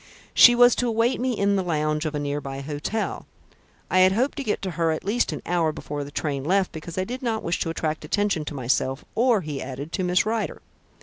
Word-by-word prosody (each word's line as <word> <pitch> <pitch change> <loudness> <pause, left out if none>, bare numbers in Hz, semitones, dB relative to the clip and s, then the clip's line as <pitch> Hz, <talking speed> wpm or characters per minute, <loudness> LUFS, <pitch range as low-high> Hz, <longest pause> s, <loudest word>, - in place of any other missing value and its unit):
She 240 - +8
was 245 0 +7
to 245 - +1
await 230 +2 +1
me 250 -3 0
in 200 0 +2
the - - +1
lounge 155 -2 0
of 155 - -4
a - - -1
near 145 0 -2
by 135 0 -6
hotel. 150 +10 -3 0.6
I 185 - +4
had 185 +1 +6
hoped 255 +7 0
to 280 - -2
get 215 - -1
to 190 - -2
her 165 0 0
at 155 - -2
least 230 +5 +1
an - - -6
hour 170 -2 +1
before 145 -1 -5
the 140 - -8
train 145 -2 -3
left, 190 +4 +1
because 160 +2 -8
I 185 - +1
did 250 +6 -6
not 230 -3 -2
wish 170 - -1
to - - -1
attract 155 -1 -2
attention 200 +1 0
to 150 - -6
myself, 130 +1 -1
or," 235 -3 +3
he 150 -4 -5
added, 140 +4 -6
"to 185 - -2
Miss 180 +1 +2
Rider. 220 0 -2
170 Hz, 240 wpm, -24 LUFS, 150-220 Hz, 0.6 s, She